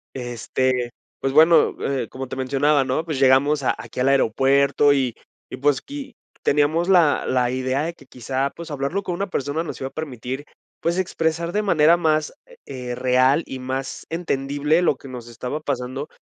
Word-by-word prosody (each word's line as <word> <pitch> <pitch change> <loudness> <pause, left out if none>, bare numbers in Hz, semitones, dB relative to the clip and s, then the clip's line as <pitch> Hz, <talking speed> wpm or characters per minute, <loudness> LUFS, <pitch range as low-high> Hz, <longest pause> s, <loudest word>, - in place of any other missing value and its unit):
Este, 125 0 -1 0.3
pues 135 - -1
bueno, 160 +3 +5
eh, 135 -5 -2
como 130 0 -7
te 130 - -6
mencionaba, 140 +2 +2
¿no?, 130 +5 -1
pues 155 -5 -3
llegamos 140 +2 +4
a - - +2
aquí - - -10
al 130 - +2
aeropuerto 140 +2 +3
y 130 -4 0 0.4
y, - - -5
pues 140 0 +1
qui 280 -4 -8 0.3
teníamos 150 +4 +2
la 170 -6 +4
la 125 -1 +1
idea 130 +2 -1
de 165 +2 -3
que 140 - -19
quizá, 130 +2 -2
pues 170 +2 -10
hablarlo 145 +7 -2
con 180 -2 -3
una 200 +2 -2
persona 150 -2 -2
nos 165 - -7
iba 130 - -3
a - - -20
permitir, 135 -3 -5 0.4
pues, 170 +2 0
expresar 170 -2 -1
de 210 +2 +1
manera 170 -4 +4
más, 155 -3 +1 0.3
eh, 125 -2 -5
real 130 +4 +3
y 130 - -7
más 130 +1 -5
entendible 150 -1 0
lo 175 - +3
que 135 - -12
nos 125 -2 -8
estaba 125 +5 -5
pasando 135 0 -4
140 Hz, 180 wpm, -22 LUFS, 130-160 Hz, 0.4 s, bueno